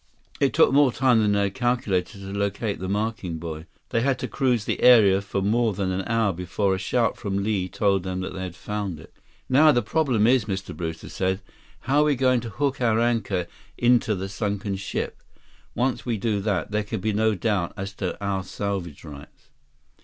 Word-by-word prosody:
163 140 - +4
It 125 - -6
took - - +5
more 140 -2 +5
time 125 -1 +3
than 105 -1 +2
they 100 0 +2
had 100 -1 -1
calculated 115 -6 -1
to 95 0 -7
locate 100 +1 -2
the 95 +1 -4
marking 105 -4 -2
buoy. 80 0 -7 0.2
They 115 - +1
had 135 0 +1
to - - -4
cruise 125 -6 0
the - - -2
area 105 -6 +6
for 100 -1 -3
more 110 +2 +2
than 95 -1 -1
an 95 0 -3
hour 115 -4 +1
before 90 +3 -1
a 95 - -2
shout 120 +3 0
from 100 -2 -2
Li 100 -3 -1
told 100 -1 +1
them 95 0 -4
they 95 0 -5
had 90 -2 -5
found 100 -3 -4
it. - - -15 0.3
"Now 150 +4 +6
the 120 -3 +1
problem 130 -10 +1
is," 125 -1 +4
Mr. 95 -2 -4
Brewster 80 -2 -5
said, 95 0 -1 0.4
"how 140 +3 +1
are - - +4
we 150 -2 +2
going 130 -1 +3
to 115 0 -6
hook 140 +3 -2
our 115 -2 +3
anchor 110 -6 0 0.3
into 120 -2 +3
the 95 +1 -4
sunken 100 0 -3
ship? 95 0 -4 0.5
Once 125 +2 0
we 120 -3 -1
do 105 0 0
that, 100 -1 -1
there 105 0 0
can 105 +1 -4
be 110 +2 -1
no 110 +1 +2
doubt 100 -3 0
as 100 0 -5
to 95 -2 -4
our 95 -1 -1
salvage 95 -5 -4
rights." 70 -3 -12
105 Hz, 205 wpm, -24 LUFS, 95-120 Hz, 0.5 s, area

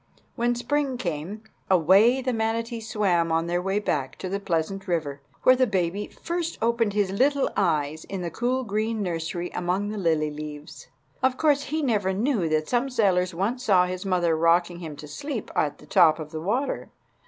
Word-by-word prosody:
When 240 0 +1
spring 275 +1 -1
came, 180 +1 -4 0.3
away 195 - +5
the 255 -1 0
manatees 225 0 -2
swam 175 -6 +1
on 165 0 +1
their 175 +1 -1
way 195 +2 -1
back 145 -10 -1
to 185 - -5
the 200 +2 -2
pleasant 190 +2 -2
river, 150 -5 -2 0.2
where 255 - +7
the 255 0 +2
baby 190 0 -1 0.2
first 340 0 -2
opened 230 -2 +1
his 205 -2 +1
little 275 +7 +2
eyes 160 -5 0
in 195 -2 -5
the 170 - -3
cool 250 +6 -1
green 215 0 -1
nursery 175 0 -3
among 185 +3 -1
the 210 0 -4
lily 160 -4 +1
leaves. 150 +1 -8 0.3
Of 260 -1 +2
course 290 -2 +2
he 310 +3 -2
never 205 -7 +1
knew 210 - 0
that 155 0 0
some 250 +2 +1
sailors 185 -7 +1
once 225 +8 -1
saw 190 -7 +4
his 180 0 -4
mother 175 -4 +1
rocking 170 +2 +2
him 160 -4 -7
to 150 +1 -10
sleep 240 - -5
at 145 - 0
the - - -16
top 155 +1 +5
of 155 -2 -7
the 155 - -5
water. 240 - -1
195 Hz, 190 wpm, -25 LUFS, 165-235 Hz, 0.3 s, where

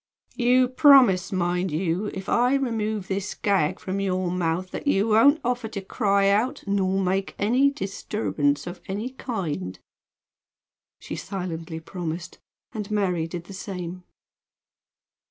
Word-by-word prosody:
"You 250 0 +4
promise, 250 - +6
mind 180 0 0
you 170 +5 -1
if 190 -1 -6
I 245 +3 +3
remove 220 -6 -1
this 195 0 -3
gag 195 -8 +1
from 190 +1 -3
your 185 -2 -1
mouth 180 +1 -1
that - - -6
you 215 -5 +2
won't 275 +8 +5
offer 245 -1 -1
to 220 -2 -5
cry 200 0 +1
out, 245 +8 +1
nor 195 -1 +1
make 190 +1 -1
any 250 +7 +3
disturbance 195 - -2
of 175 0 -7
any 210 +6 -3
kind?" 165 - -4 1.2
She - - -6
silently 175 -4 -5
promised; 170 0 -6 0.3
and 210 -2 -5
Mary 185 -6 0
did 170 0 -6
the 195 - -11
same. 180 -2 -6
195 Hz, 135 wpm, -25 LUFS, 180-220 Hz, 1.2 s, promise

